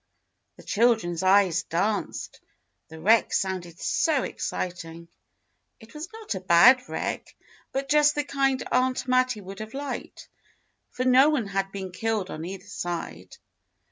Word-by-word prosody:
The - - -15
children's 220 -7 +1
eyes 190 -2 +4
danced; 200 +5 -3 0.5
the 160 - -11
wreck 220 +7 +4
sounded 180 -3 -2
so 305 -5 +1
exciting. 170 -2 -5 0.7
It 225 -1 -16
was 305 +3 -7
not 445 - -6
a 190 - -4
bad 190 +9 +5
wreck, - - -4 0.4
but 275 +1 -3
just 300 0 +4
the 295 - 0
kind 270 -2 0
Aunt 255 +1 +1
Mattie 255 -3 +1
would 195 +1 -10
have 220 +3 -8
liked, 280 +1 -6 0.6
for 255 - -4
no 260 +3 +6
one 285 -8 0
had 195 0 -2
been 190 -2 -6
killed 215 0 -2
on 155 - -6
either 190 +1 -8
side. 175 -4 -6
215 Hz, 140 wpm, -26 LUFS, 185-255 Hz, 0.7 s, no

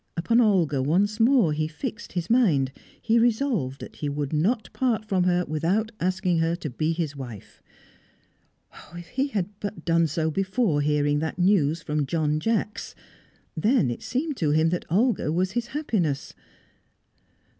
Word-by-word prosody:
Upon 230 +8 +3
Olga 175 - +2
once 200 - +1
more 230 - +4
he 155 +1 -1
fixed 230 - -6
his 175 -2 -2
mind. 175 - +3 0.3
He 230 +1 +2
resolved 225 - 0
that - - -10
he 145 - -3
would 145 0 -3
not 210 +10 0
part 230 -4 0
from 190 -4 +1
her 180 0 +2
without 180 +9 0
asking 185 -1 0
her 165 +1 +1
to 165 -5 -6
be 155 +5 -1
his 160 -3 -3
wife. 120 -7 -10 1.3
If 175 0 -9
he 270 +3 0
had 205 -9 -2
but 205 +1 -6
done 165 -1 +3
so 160 +1 -1
before 190 -2 0
hearing 145 0 +1
that 160 +1 -3
news 170 -4 +2
from 150 -2 -1
John 155 0 0
Jacks! 215 +2 -2 0.6
Then 210 - +2
it 120 - -6
seemed 285 +2 -2
to 155 - 0
him 155 +2 +3
that 175 +1 -2
Olga 210 -2 +1
was 185 +3 0
his 235 +3 -2
happiness. 210 - -2
175 Hz, 160 wpm, -25 LUFS, 155-220 Hz, 1.3 s, more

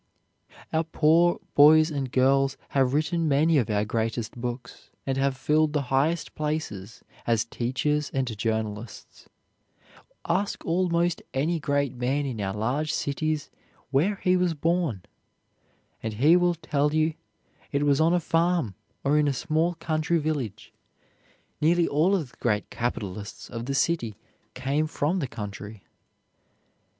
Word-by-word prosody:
Our 160 +1 +2
poor 165 +2 +3
boys 155 +2 +7
and 135 -4 -3
girls 135 +1 +3
have 135 -1 +2
written 160 +2 +1
many 150 +2 +4
of 115 -3 -1
our 105 0 +1
greatest 115 +1 -2
books, 120 0 -6 0.2
and 135 - -1
have 135 0 0
filled 150 +2 +2
the 150 - +1
highest 155 +5 +1
places 130 -10 -4 0.2
as 115 -2 +2
teachers 140 +6 -1
and 130 -4 -2
journalists. 110 0 -4 1.0
Ask 190 +4 -1
almost 170 0 +1
any 160 +5 +1
great 140 -3 0
man 130 +4 -1
in 120 -6 -4
our 95 0 -2
large 130 +8 -1
cities 155 +1 -2 0.4
where 165 +10 +2
he 185 -1 +4
was 180 -2 +1
born, 160 - 0 1.0
and 110 -1 -4
he 145 +10 +5
will 175 -1 +3
tell 150 -2 0
you 155 0 +2 0.6
it 140 0 +1
was 145 0 +3
on 165 +2 +4
a - - +3
farm 165 - +1 0.3
or 145 +2 +3
in 150 - +2
a 140 - +1
small 160 +6 0
country 160 +1 0
village. 140 -10 -3 0.9
Nearly 170 +2 +3
all 165 +7 +3
of 155 -10 -3
the - - -23
great 105 0 -1
capitalists 105 -4 -4
of 115 +1 -5
the 140 - -1
city 135 -8 0 0.4
came 145 +4 0
from 155 +4 -1
the 140 - -2
country. 105 -3 -8
145 Hz, 140 wpm, -26 LUFS, 120-160 Hz, 1.0 s, boys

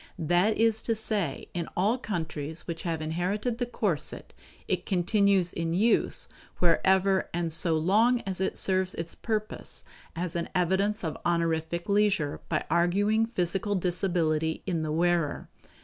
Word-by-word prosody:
That 175 +6 +2
is 225 0 +3
to 230 - 0
say, 210 -9 -1
in 170 -1 -3
all 210 +8 +2
countries 160 - -4
which 165 -1 -5
have 165 -2 -2
inherited 195 +9 -2
the 245 - -1
corset 200 -10 -2 0.3
it - - -1
continues 195 0 +2
in 165 0 -2
use 220 +5 +2 0.3
wherever 190 +2 +3
and 170 -2 0
so 165 0 +2
long 220 +9 +3
as 190 -2 -3
it 190 - -1
serves 185 -1 0
its 165 0 -3
purpose 215 -2 -4 0.3
as 175 +1 -3
an 170 - -2
evidence 190 +4 +1
of 160 -3 -3
honorific 170 0 0
leisure 200 -7 +1
by - - 0
arguing 205 +6 +2
physical 195 -1 -1
disability 170 -4 0
in 175 -4 -1
the 155 -1 -2
wearer. 170 -1 0
180 Hz, 145 wpm, -28 LUFS, 165-205 Hz, 0.3 s, is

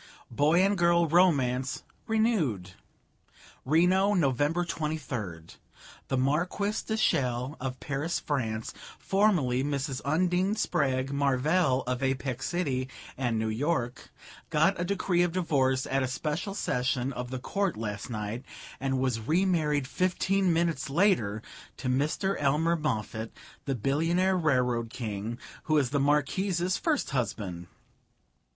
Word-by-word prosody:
Boy 150 +9 +3
and 200 +1 +2
girl 170 -1 +3
romance 135 -7 +2 0.2
renewed. 190 - +1 0.9
"'Reno, 185 +7 +3
November 150 +2 +1
23d. 130 - -4 0.5
The 130 - 0
Marquise 175 +10 0
de 220 - -3
Chelles, 130 - 0
of 130 -1 -4
Paris, 150 +4 -2
France, 115 -7 -2 0.2
formerly 175 -11 +2
Mrs. 140 -2 -2
Undine 180 +6 +1
Spragg 135 -9 0
Marvell, 140 +1 +2
of 125 +1 -2
Apex 135 -1 -1
City 135 -7 -1 0.3
and 120 -4 -1
New 110 0 0
York, 125 +1 -2 0.4
got 170 +5 +2
a - - +1
decree 185 -1 +1
of 175 -1 +1
divorce 135 -7 +1
at 135 +1 0
a 130 - 0
special 155 +9 -3
session 125 -5 -1
of 125 0 -5
the 130 - -4
Court 195 - -1
last 105 -1 -4
night, 110 +2 -4 0.4
and 135 0 0
was 130 -3 0
remarried 155 -5 +2
fifteen 185 +3 +1
minutes 165 -2 0
later 135 - +2 0.3
to 130 - -5
Mr. 150 +9 0
Elmer 150 +4 +2
Moffatt, 110 -7 -2 0.4
the 135 - -1
billionaire 165 - +1
Railroad 125 -8 +1
King, 115 -2 -4 0.3
who 155 - +2
was 140 -4 +2
the 145 - +1
Marquise's 170 +6 +1
first 310 - 0
husband. 100 -9 -3
145 Hz, 125 wpm, -28 LUFS, 125-175 Hz, 0.9 s, Boy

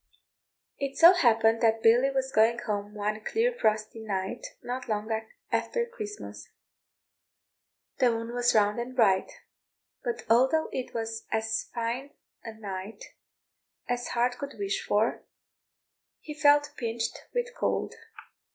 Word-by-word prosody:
It 275 -1 -3
so 340 +2 +9
happened 225 -8 +3
that 225 -1 +2
Billy 240 +4 +5
was 265 -1 -1
going 225 +1 +4
home 205 0 -3
one 210 +1 -2
clear 470 - +1
frosty 215 - 0
night 200 +1 -4 0.2
not 250 0 -5
long 215 +1 -2 0.4
after 475 -1 0
Christmas; 425 -3 -8 1.5
the 250 - +5
moon 230 0 -3
was 245 -1 +2
round 210 +1 +3
and 250 +2 -5
bright; 195 -6 +3 0.7
but 475 -2 -3
although 260 +8 +3
it 255 - -5
was 225 0 -4
as 220 0 -1
fine 240 +4 -3 0.3
a 225 - -6
night 200 -1 -8 0.7
as 245 0 -2
heart 245 +1 0
could 280 -1 -6
wish 200 -1 -2
for, 215 +3 +1 1.0
he 300 - -8
felt 290 -1 +4
pinched 230 -1 -3
with 485 0 -1
cold. - - -1
235 Hz, 130 wpm, -28 LUFS, 220-270 Hz, 1.5 s, so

